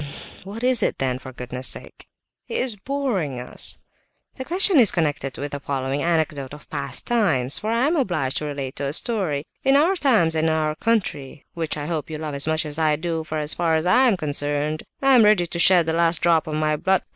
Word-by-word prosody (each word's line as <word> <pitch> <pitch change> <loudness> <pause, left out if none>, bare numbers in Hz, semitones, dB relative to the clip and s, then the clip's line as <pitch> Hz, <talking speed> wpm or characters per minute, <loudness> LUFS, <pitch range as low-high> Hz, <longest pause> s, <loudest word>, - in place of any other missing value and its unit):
"What 205 +5 -8
is 255 -1 +3
it - - 0
then, 130 -1 -1
for 130 - -10
goodness' 125 0 -3
sake?" - - -7 0.4
"He 465 - -8
is 255 - 0
boring 200 - -3
us!" 125 - -6 0.6
"The 260 - -6
question 360 +2 +4
is 225 -6 +6
connected 145 -5 -2
with 145 +1 -5
the 145 - -4
following 135 0 -3
anecdote 155 -5 -1
of 150 - -16
past 140 -3 -1
times; 145 - +2
for 215 - -4
I 230 +3 +1
am 315 +4 +1
obliged 175 - -1
to 150 - -2
relate 140 -3 -5
a 140 0 -2
story. 170 - 0 0.2
In 270 +1 +3
our 325 +7 +3
times, 225 - +2
and 160 0 +1
in 160 - +2
our 155 -1 0
country, 155 -8 -2
which 160 -3 -3
I 145 - -5
hope 160 -1 -4
you 155 - -5
love 155 -1 -5
as 140 +2 0
much 160 0 0
as 150 +1 -4
I 155 -1 +2
do, 160 +1 -3
for 155 0 -5
as 150 0 +4
far 165 -2 0
as 160 +1 -1
I 250 +8 +4
am 215 -6 +2
concerned, 145 0 -2 0.2
I 270 0 +5
am 245 -3 +7
ready 210 -4 +4
to 170 0 -5
shed 175 0 +5
the 160 - -1
last 165 -1 +2
drop 165 -2 +2
of 155 - -3
my 155 0 0
blood... 190 +4 +1
160 Hz, 225 wpm, -22 LUFS, 145-210 Hz, 0.6 s, am